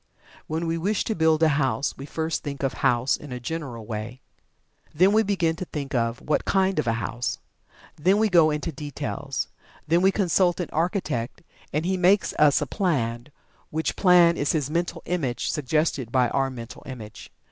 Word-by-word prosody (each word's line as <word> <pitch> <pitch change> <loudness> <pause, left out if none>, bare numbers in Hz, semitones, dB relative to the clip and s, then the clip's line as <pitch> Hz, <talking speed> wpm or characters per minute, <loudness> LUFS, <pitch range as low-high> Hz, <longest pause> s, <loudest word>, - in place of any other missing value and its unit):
When 160 +2 -2
we 165 0 -1
wish 200 +4 0
to 220 - -1
build 160 -3 +3
a - - +6
house, 135 +1 0
we 140 - -9
first 160 +2 -2
think 140 -2 -6
of 135 - 0
"house" 120 +2 +3
in 145 - -11
a 125 - -4
general 125 -4 -5
way. 110 +3 -5 0.8
Then 185 +5 +5
we 220 - +5
begin 185 -6 0
to 185 - -4
think 145 -3 -6
of 115 -1 0
"what 150 - 0
kind" 190 -3 +1
of 150 - -1
a 115 - +2
house. 115 +2 -3 0.6
Then 185 +7 +3
we 220 +1 +3
go 170 -5 +5
into 150 +2 -2
details. 145 -1 -4 0.4
Then 170 +3 +3
we 190 +1 +5
consult 185 -2 +2
an 175 - -3
architect, 160 - -2 0.3
and 155 +3 -1
he 190 +1 0
makes 185 0 +3
us 150 -1 +5
a - - 0
plan, 130 - -1 0.4
which 160 +1 -2
plan 175 -3 +5
is 145 - +1
his 150 -3 -1
mental 170 +2 -2
image, 145 -9 -1
suggested 150 -3 -1
by 125 -2 +3
our 135 -1 0
mental 120 -2 -9
image. 115 -5 -9
155 Hz, 185 wpm, -25 LUFS, 130-175 Hz, 0.8 s, a